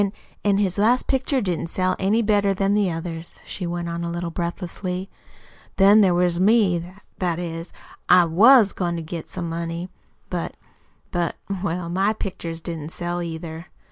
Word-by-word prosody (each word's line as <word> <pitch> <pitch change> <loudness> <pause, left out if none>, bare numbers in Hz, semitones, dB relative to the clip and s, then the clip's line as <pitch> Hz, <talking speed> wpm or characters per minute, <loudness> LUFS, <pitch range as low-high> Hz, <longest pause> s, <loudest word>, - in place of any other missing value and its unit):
"An' 200 0 0 0.3
an' 200 -1 +3
his 200 -2 0
last 240 +5 +3
pictures 265 -1 +1
didn't 175 -3 -1
sell 185 +2 0
any 210 +4 +2
better 205 -2 +2
than 195 +1 +1
the 205 -2 +2
others," 165 0 -6
she 180 - -5
went 170 0 -3
on 170 0 -3
a 170 - -2
little 170 0 -3
breathlessly. 180 +2 -4 0.7
"Then 200 +2 +7
there 185 -3 +4
was 175 -1 +2
me 185 -4 +3 0.3
that 175 -3 0
is, 165 -1 -5 0.4
I 180 -1 +7
WAS 210 +6 +6
goin' 175 -2 -1
to 165 - -4
get 160 +1 -6
some 170 - -4
money; 170 +2 -4 0.4
but - - -3 0.5
but, 175 -1 -1 0.3
well 175 -2 -2
MY 190 +5 +1
pictures 170 -5 -5
didn't 160 -3 -5
sell, 175 +1 -3
either." 165 -1 -6
175 Hz, 170 wpm, -23 LUFS, 170-200 Hz, 0.7 s, Then